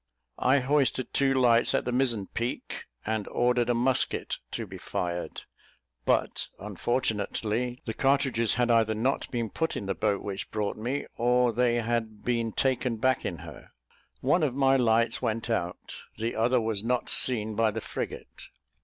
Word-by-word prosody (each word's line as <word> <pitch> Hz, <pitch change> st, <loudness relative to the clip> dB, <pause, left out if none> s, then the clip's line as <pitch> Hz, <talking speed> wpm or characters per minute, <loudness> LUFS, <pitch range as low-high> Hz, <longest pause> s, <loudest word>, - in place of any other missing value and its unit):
I 130 Hz, +2 st, +3 dB
hoisted 135 Hz, -1 st, +1 dB
two 135 Hz, -1 st, +3 dB
lights 120 Hz, -2 st, +4 dB
at -, -, 0 dB
the 125 Hz, -, -1 dB
mizen 120 Hz, -5 st, +1 dB
peak, 120 Hz, +5 st, -4 dB, 0.2 s
and 110 Hz, -1 st, -2 dB
ordered 120 Hz, -1 st, +1 dB
a 120 Hz, -, +3 dB
musket 125 Hz, +2 st, 0 dB
to -, -, -4 dB
be -, -, -10 dB
fired; 85 Hz, 0 st, -4 dB, 0.6 s
but, -, -, +1 dB
unfortunately, 110 Hz, +3 st, -2 dB
the 115 Hz, -, -3 dB
cartridges 135 Hz, -4 st, +2 dB
had 120 Hz, -1 st, +2 dB
either 110 Hz, -1 st, +3 dB
not 130 Hz, +6 st, 0 dB
been 115 Hz, -4 st, -3 dB
put 160 Hz, 0 st, -1 dB
in -, -, -5 dB
the 95 Hz, -, -1 dB
boat 100 Hz, 0 st, 0 dB
which 100 Hz, -1 st, -4 dB
brought 105 Hz, -2 st, -2 dB
me, 125 Hz, +6 st, -3 dB
or 125 Hz, 0 st, +3 dB
they 120 Hz, +1 st, +2 dB
had 115 Hz, -2 st, -2 dB
been 115 Hz, -2 st, 0 dB
taken 125 Hz, -1 st, 0 dB
back 130 Hz, +3 st, +1 dB
in -, -, -3 dB
her. -, -, -11 dB, 0.5 s
One 150 Hz, +7 st, +3 dB
of 140 Hz, -5 st, 0 dB
my 135 Hz, -1 st, +4 dB
lights 115 Hz, -2 st, +3 dB
went 115 Hz, -1 st, -2 dB
out; 90 Hz, -6 st, -3 dB, 0.2 s
the 115 Hz, +2 st, -2 dB
other 120 Hz, +3 st, +3 dB
was 110 Hz, -3 st, -2 dB
not 125 Hz, +1 st, 0 dB
seen 110 Hz, -4 st, +3 dB
by 115 Hz, +1 st, +2 dB
the 110 Hz, +1 st, -3 dB
frigate. -, -, -6 dB
120 Hz, 165 wpm, -28 LUFS, 110-125 Hz, 0.6 s, lights